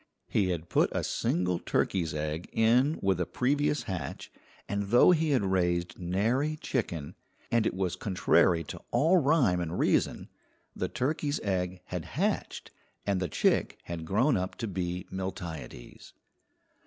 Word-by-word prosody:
He 100 -3 +1
had 85 -2 -3
put - - +2
a - - -1
single 90 0 0
turkey's 85 -5 0
egg 75 +2 -3
in 125 +7 +3
with 95 -2 +2
a 90 - -1
previous 145 +3 +1
hatch, 90 - -5 0.4
and 100 0 -2
though 120 - +7
he 160 -2 +2
had 130 -7 +2
raised 90 -2 0
nary 115 - 0
chicken, 90 - -3 0.4
and 115 -2 +3
it - - -2
was 95 -2 -1
contrary 90 -3 +2
to - - -8
all 165 +6 +4
rhyme 140 - +3
and 85 0 -3
reason, - - +1 0.5
the - - -1
turkey's 145 +2 -1
egg 90 -2 -2
had 90 -3 -5
hatched - - -1 0.3
and 100 -2 +1
the 90 -2 -2
chick - - +1
had 85 -2 -5
grown 115 - +2
up 95 0 -3
to 115 - -4
be 90 -2 -3
Miltiades. 90 -9 -7
95 Hz, 150 wpm, -29 LUFS, 90-125 Hz, 0.5 s, though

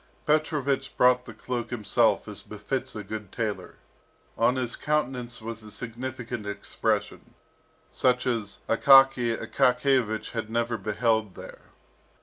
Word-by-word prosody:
Petrovich 145 -3 0
brought 125 0 +4
the - - -9
cloak 120 -2 -4
himself 115 -4 +1
as - - -7
befits - - -5
a 105 - -5
good 105 -1 -7
tailor. 110 -3 -4 0.6
On 120 +2 +3
his 125 -2 -2
countenance 125 -6 -2
was 115 0 -6
a 110 - -11
significant 115 0 -6
expression, 105 - -3 0.6
such 125 -1 +2
as 110 -5 -2
Akaky 135 -1 +6
Akakiyevich 125 -4 +1
had 115 -2 -4
never 115 0 -1
beheld 110 0 0
there. - - -11
120 Hz, 125 wpm, -27 LUFS, 110-130 Hz, 0.6 s, Akaky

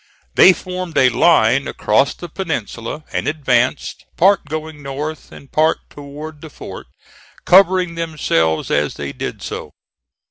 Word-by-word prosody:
They 185 - +8
formed 185 -2 -5
a 130 - +6
line 130 -2 +3
across 120 +7 +1
the 175 - -8
peninsula 150 - -5
and - - -2
advanced, 135 -4 0
part 195 +1 +4
going 155 0 -6
north 145 +3 -6
and 140 - -14
part 155 +1 +2
toward 145 +2 -9
the 160 - -9
fort, - - -10 0.6
covering 185 -1 +5
themselves 150 - 0
as 75 0 0
they 70 -1 -5
did - - -6
so. - - -6
150 Hz, 135 wpm, -18 LUFS, 130-170 Hz, 0.6 s, They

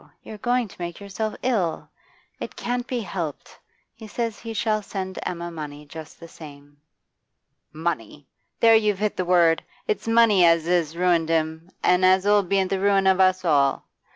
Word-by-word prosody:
You're 215 - -10
going 245 +1 0
to 180 - -14
make 175 -1 -5
yourself 205 +2 -4
ill. 195 -11 -1 0.5
It - - -7
can't 245 0 -3
be 245 -2 -2
helped. 170 -8 -6 0.3
He 220 - -12
says 230 0 -4
he 230 - -7
shall 215 -1 0
send 190 -2 -6
Emma 175 -1 -5
money 150 -2 -8
just 155 +1 -11
the 170 - -11
same.' 145 -3 -14 0.9
'Money! 155 -4 -4 0.3
There 230 -1 +6
you've 210 -3 +2
hit 210 +1 -1
the 185 - -2
word; 170 -2 +3 0.2
it's 435 - -2
money 225 -5 +5
as 165 -1 +4
'as 170 -2 0
ruined 175 -2 +2
him, 160 +1 -1
and 180 +1 +3
as 185 +1 +4
'll 205 0 +4
be 195 +1 +1
the 190 +1 -2
ruin 195 0 +2
of 190 0 +3
us 185 0 +3
all. 140 -4 +2
185 Hz, 175 wpm, -23 LUFS, 165-210 Hz, 0.9 s, There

